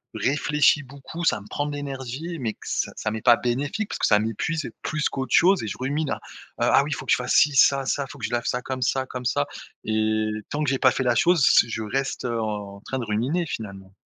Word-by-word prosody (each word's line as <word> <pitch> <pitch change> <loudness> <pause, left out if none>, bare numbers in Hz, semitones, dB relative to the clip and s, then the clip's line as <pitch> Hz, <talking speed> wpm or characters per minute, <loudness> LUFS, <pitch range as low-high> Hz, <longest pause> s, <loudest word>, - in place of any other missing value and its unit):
réfléchis 150 +2 +2
beaucoup, 140 +5 -9
ça - - +2
me 100 - -14
prend 145 +6 -2
de 145 - -4
l'énergie, 140 +4 -5
mais 115 -4 -2
que - - -37
c - - -1
ça 110 - -3
m'est 110 0 -4
pas 120 -2 +6
bénéfique 145 - -2
parce - - -5
que - - +2
ça 105 - +5
m'épuise 115 +9 -2
plus 155 -1 -1
qu'autre 135 -1 -4
chose 185 +2 +5
et - - -4
je 100 - -5
rumine 140 +3 -1
à - - -2 0.4
ah - - +4
oui 145 - -5
il - - 0
faut - - -7
que - - -1
je - - +5
fasse 125 0 -2
ci, 150 -2 +5
ça, 135 +1 +5
ça, 140 +1 -1
faut 145 - -11
que 120 - -4
je - - -4
lave 120 0 -1
ça 125 0 -1
comme 130 -1 -4
ça 130 +2 +1
comme 125 -1 -7
ça, 70 -11 +1 0.4
et 110 0 0 0.2
tant 150 +1 -2
que 140 - +1
j'ai 135 - 0
pas 130 - +6
fait 130 - -1
la 125 - +3
chose 170 -5 +4
c 115 - +5
je 110 0 -3
reste, 135 +5 -2
heu, 115 -2 -1
en 105 -2 -5
train 130 - -4
de 120 - -3
ruminer 125 +12 0
finalement. 95 -8 -7
130 Hz, 260 wpm, -24 LUFS, 110-145 Hz, 0.4 s, pas